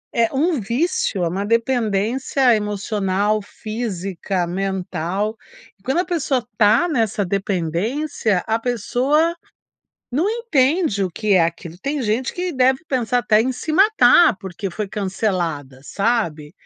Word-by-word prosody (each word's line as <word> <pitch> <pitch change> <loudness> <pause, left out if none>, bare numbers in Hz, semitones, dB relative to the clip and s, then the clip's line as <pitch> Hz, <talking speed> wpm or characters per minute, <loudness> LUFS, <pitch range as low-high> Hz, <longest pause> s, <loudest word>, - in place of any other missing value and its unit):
é 230 -1 +2
um 310 +1 +1
vício, 235 - -1
é - - +1
uma 195 +4 -2
dependência, 230 +2 +1
emocional, 205 0 -1
física, 195 -4 -4
mental. 190 +2 -2 0.4
E - - -31
quando 270 +7 0
a 365 - +1
pessoa 275 -8 -1
tá 220 +10 +4
nessa 225 - 0
dependência, 195 - -1
a 225 +1 +1
pessoa 255 - +1 0.8
não 325 +10 +1
entende 315 - +1
o 185 - -3
que 205 +3 0
é 180 - +5
aquilo. 170 0 -5
Tem 280 -1 -2
gente 225 +4 -1
que 360 -1 -3
deve 260 +3 +2
pensar 250 -3 +1
até 215 -2 +3
em 260 +3 0
se 310 +5 -5
matar 380 - +5
porque 190 0 -5
foi 205 +3 -5
cancelada, 180 -10 -2
sabe. 175 -9 -1
220 Hz, 135 wpm, -20 LUFS, 195-265 Hz, 0.8 s, é